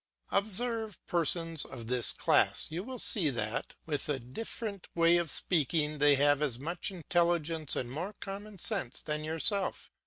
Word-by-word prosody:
Observe 220 +1 -1
persons 165 -1 +2
of 120 -3 -9
this 125 0 +2
class; - - +2
you 170 +4 -3
will 255 +3 -7
see 190 -8 +1
that, 110 -4 -3
with 150 -1 -1
a 145 - +1
different 200 - -6
way 170 0 +5
of 170 -2 -1
speaking, 150 -2 +1
they 145 0 +6
have 145 +1 +3
as 135 -6 0
much 170 +7 -3
intelligence 170 -4 +1
and 125 -1 -3
more 175 +9 -5
common 200 +1 -8
sense 175 - 0
than 150 0 -3
yourself. 165 +5 +1
165 Hz, 155 wpm, -31 LUFS, 145-195 Hz, -, they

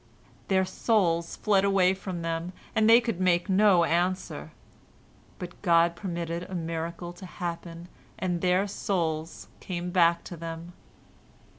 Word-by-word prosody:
"Their 190 -1 +2
souls 185 -4 +1
fled 200 -3 +2
away 195 -2 +4
from 185 -3 -6
them, 165 +2 -3 0.2
and 220 0 +3
they 230 +1 +9
could 230 -6 -3
make 175 -1 +2
no 190 -2 +5
answer, 175 - -1 0.9
but 175 -1 -9
God 170 -2 +4
permitted 170 -3 -4
a 185 +1 -7
miracle 170 +1 -4
to 180 +2 -11
happen, 170 -1 -6 0.3
and 175 -2 -2
their 185 +2 +3
souls 165 -5 -2
came 180 -1 -4
back 170 -1 +3
to 175 - -8
them. 165 +1 -7
175 Hz, 135 wpm, -27 LUFS, 170-190 Hz, 0.9 s, they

